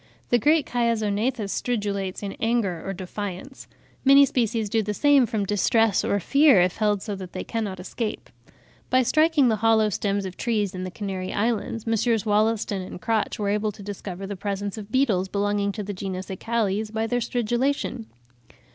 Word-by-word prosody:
The 240 - +5
great 300 +5 +3
Chiasognathus 230 -1 0
stridulates 205 -5 -2
in 200 - -3
anger 225 -7 0
or 195 - -3
defiance; 195 +6 -7 0.4
many 275 +1 +7
species 230 -4 0
do 220 +2 +1
the 210 0 -3
same 285 -2 +4
from 210 -2 -1
distress 210 +1 +2
or 205 - +1
fear, 280 - +5
if 180 0 +2
held 210 -2 +1
so 210 -3 -4
that 185 -2 -9
they - - -4
cannot 210 -5 -3
escape; 215 +4 -5 0.6
by 255 0 +4
striking 310 +1 +3
the 220 -2 +2
hollow 220 0 +3
stems 200 0 -1
of 185 -1 -7
trees 215 -4 -1
in 185 0 -4
the - - -4
Canary 190 -1 -5
Islands, 225 0 -1
Messrs. 225 0 +1
Wollaston 215 -1 +1
and 185 - -8
Crotch 225 +2 -1
were 205 -2 -1
able 210 +1 0
to 205 0 -12
discover 195 -1 -6
the 200 +1 -5
presence 200 +1 -3
of 215 -1 -9
beetles 225 -8 +2
belonging 205 0 0
to 210 - -4
the 205 +1 -5
genus 190 0 -5
Acalles 215 +1 -1
by 220 0 -1
their 245 +1 -1
stridulation. 240 +1 -1
210 Hz, 175 wpm, -24 LUFS, 200-235 Hz, 0.6 s, many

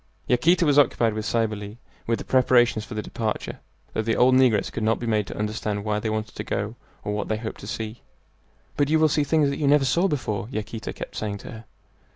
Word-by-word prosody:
Yaquita 165 +8 +3
was 145 -1 +5
occupied 115 -5 +3
with 110 0 -3
Cybele 105 -2 -1 0.3
with 115 0 +1
the - - -8
preparations 125 -3 +3
for 110 - -8
the 105 - -3
departure, 110 -2 -3 0.3
though - - 0
the 110 0 0
old 125 +1 +5
negress 130 -4 +3
could - - -4
not 110 +1 +2
be 120 - -5
made 110 -3 +1
to - - -7
understand 105 -1 -2
why 105 -1 0
they 110 - -2
wanted 110 0 -3
to - - -5
go 105 +3 -3 0.3
or 105 - -2
what 105 - -2
they 110 - -1
hoped 110 0 -6
to 100 - -9
see. 110 0 -5 0.8
"But 145 -1 +2
you 160 - +4
will 155 0 +4
see 150 +1 +2
things 145 -1 +2
that - - -4
you 145 - +1
never 145 -1 +5
saw 170 +9 +3
before," 110 - -2
Yaquita 110 -1 -5
kept - - -8
saying 105 -1 -3
to - - -9
her. 110 0 -10
115 Hz, 230 wpm, -24 LUFS, 110-130 Hz, 0.8 s, was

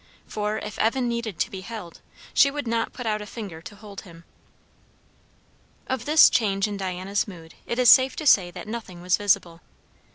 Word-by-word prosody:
For 210 0 -3
if 210 - -7
Evan 245 +3 +1
needed 235 -5 -3
to - - -1
be 190 - -7
held, 195 -4 -9 0.3
she 280 - +5
would 285 -2 -5
not 230 0 -1
put 250 - -8
out 215 -1 -1
a 210 - -8
finger 200 -8 -8
to 205 - -11
hold 205 -1 -10
him. 170 -2 -15 1.6
Of 260 -2 -3
this 305 +1 +7
change 200 -3 +1
in 205 - -5
Diana's 190 +1 -2
mood 165 -5 -12
it 235 - -3
is 250 -1 +3
safe 260 0 +5
to 310 - -6
say 190 -10 +5
that 175 - -10
nothing 210 -6 -7
was 180 0 +3
visible. 175 -4 0
210 Hz, 190 wpm, -24 LUFS, 185-235 Hz, 1.6 s, this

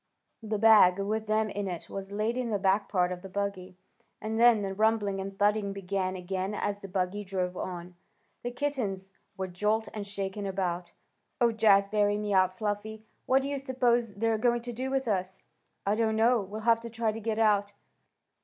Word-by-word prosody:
The 215 -1 -2
bag, 210 -4 +7
with 215 +2 -2
them 215 0 +1
in 205 -1 -3
it, 175 -3 -5
was 195 0 -7
laid 215 +3 -1
in 250 -2 -2
the 210 - +1
back 195 +1 +1
part 180 -2 +1
of 180 -1 -5
the 195 - -9
buggy, 190 -2 -4 0.4
and 220 +1 -3
then 235 -3 +6
the 195 -1 -3
rumbling 205 -2 +1
and 195 0 -7
thudding 205 0 +1
began 190 -1 -2
again 185 +2 -3
as 205 0 -2
the 195 - -8
buggy 190 +2 -2
drove 185 -2 -2
on. 180 -1 -6 0.5
The 245 - -3
kittens 245 -8 -3 0.3
were 190 - -2
jolted 210 +4 -1
and 205 -1 -5
shaken 200 0 -4
about. 180 -2 -2 0.5
"Oh, 240 -2 +4
Jazbury!" 205 -1 +3
mewed 200 -3 +2
Fluffy. 210 +3 -4 0.2
"What 265 +1 +4
do - - -2
you 280 0 -2
s'pose 245 -4 +1
they're 225 +1 0
going 240 0 +1
to 240 0 -5
do 255 +3 -3
with 265 -1 -1
us?" 190 -2 -2 0.4
"I 200 - +2
don't 220 0 +1
know. 230 +1 +4
We'll 205 +3 -7
have 230 0 +4
to 235 - -7
try 225 -1 -1
to 220 - -6
get 220 0 -2
out." 205 -2 +2
205 Hz, 190 wpm, -29 LUFS, 195-225 Hz, 0.5 s, bag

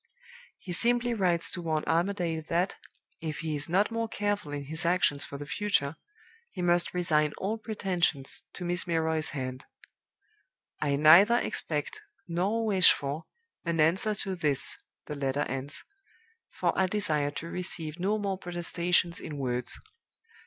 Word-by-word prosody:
He 185 - -8
simply 240 +5 +2
writes 180 -6 +2
to 180 - -3
warn 155 -2 -1
Armadale 170 -1 0
that, 175 +3 +1 0.5
if 160 -1 -4
he 160 -2 -2
is 145 +2 0
not 195 +6 +2
more 230 0 -1
careful 205 -8 -2
in 145 -1 -4
his 160 +4 -1
actions 170 -5 +2
for 140 - -7
the 145 - -7
future, 165 -3 0 0.5
he 180 - -5
must 175 0 +2
resign 155 -4 +2
all 215 +4 -2
pretensions 180 -10 -1
to 180 - -6
Miss 175 +1 +1
Milroy's 160 -2 0
hand. 130 -2 -5 1.2
'I 145 -2 +1
neither 170 +11 +7
expect, 150 -10 -1 0.3
nor 195 +7 0
wish 190 -5 +6
for, 145 +3 -3 0.4
an 170 -2 -1
answer 185 +7 +3
to 190 -1 -3
this' 150 -6 +1 0.3
(the 150 - -5
letter 140 0 -1
ends), 135 +3 -4 0.7
'for - - 0
I 190 - +3
desire 155 -8 +1
to 165 +3 -6
receive 170 -3 -3
no 200 +4 +1
mere 200 -2 -2
protestations 175 -1 0
in 150 - -6
words. 125 -2 -1
170 Hz, 150 wpm, -29 LUFS, 150-190 Hz, 1.2 s, neither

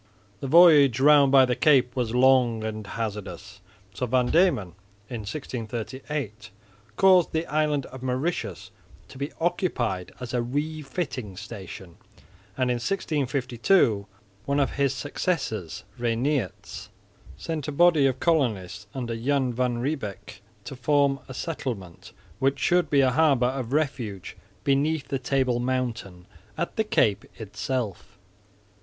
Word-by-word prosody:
The 135 - -5
voyage 145 -6 +7
round 140 -1 +6
by 135 -1 +7
the 125 -1 0
cape 130 -5 +3
was 120 -2 -1
long 125 -3 +4
and 110 -1 -5
hazardous, 105 -2 -6 0.3
so 125 +6 -3
Van 125 +1 +1
Diemen 165 - +3 0.4
in 120 - -4
1638 120 0 -5 0.5
caused 185 - +5
the 160 +1 0
island 150 -3 0
of 130 - -11
Mauritius 130 - -3 0.4
to 130 - -12
be 140 +2 -3
occupied 120 - -1
as 125 0 -7
a 125 - +1
refitting 140 - -4
station; 95 -4 -9 0.6
and 130 -1 +1
in 120 - 0
1652 130 - +1 0.4
one 140 +1 0
of 140 - +1
his 140 -1 0
successors 135 - -3 0.2
(Reinierz) 120 - -2 0.5
sent 155 -3 -4
a - - -2
body 160 -2 +4
of 130 -1 -2
colonists 110 - 0
under 120 -3 -3
Jan 130 +1 0
van 125 0 0
Riebeck 120 - -5 0.2
to 135 - -8
form 140 +1 +2
a 130 - -9
settlement, 120 - -5 0.3
which 135 +1 +1
should 175 +6 +2
be 140 -1 +4
a 130 -1 +3
harbour 140 -3 +3
of 130 -1 -2
refuge 125 - -2 0.3
beneath 145 +2 +1
the 135 - -1
Table 130 -2 0
mountain 120 -8 -3 0.3
at 170 - -3
the 220 - +1
Cape 105 - +1
itself. 105 -3 -4
130 Hz, 130 wpm, -25 LUFS, 115-145 Hz, 0.6 s, voyage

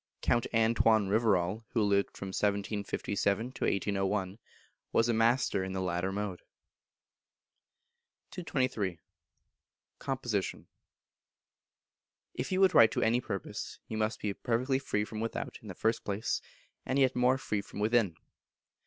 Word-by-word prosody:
Count 120 0 +2
Antoine 110 -2 +3
Rivarol, 105 -1 +2
who 115 - +2
lived 100 -1 +1
from 100 - -5
1757 100 +2 -1
to - - -3
1801, 100 0 0 0.5
was 115 - +3
a 120 - +2
master 115 -3 +2
in 95 0 -4
the 95 - -2
latter 90 +1 -1
mode. 100 -2 -3 1.9
223. 130 - -1 1.0
Composition. 120 -7 -2 1.7
If - - -4
you 185 - +1
would 190 -1 +5
write 115 - +8
to - - +1
any 120 +2 +3
purpose, 100 -5 -5
you 110 - -4
must 110 +1 0
be 105 -2 -2
perfectly 125 +5 0
free 105 -6 -1
from 110 0 -7
without, 115 +1 -4
in 110 - -12
the 95 - -7
first 110 +4 0
place, 100 +1 -1 0.4
and 130 - -1
yet 130 -2 +3
more 125 +1 +3
free 105 -6 -2
from 100 - -10
within. 105 -4 +2
110 Hz, 135 wpm, -31 LUFS, 100-120 Hz, 1.9 s, write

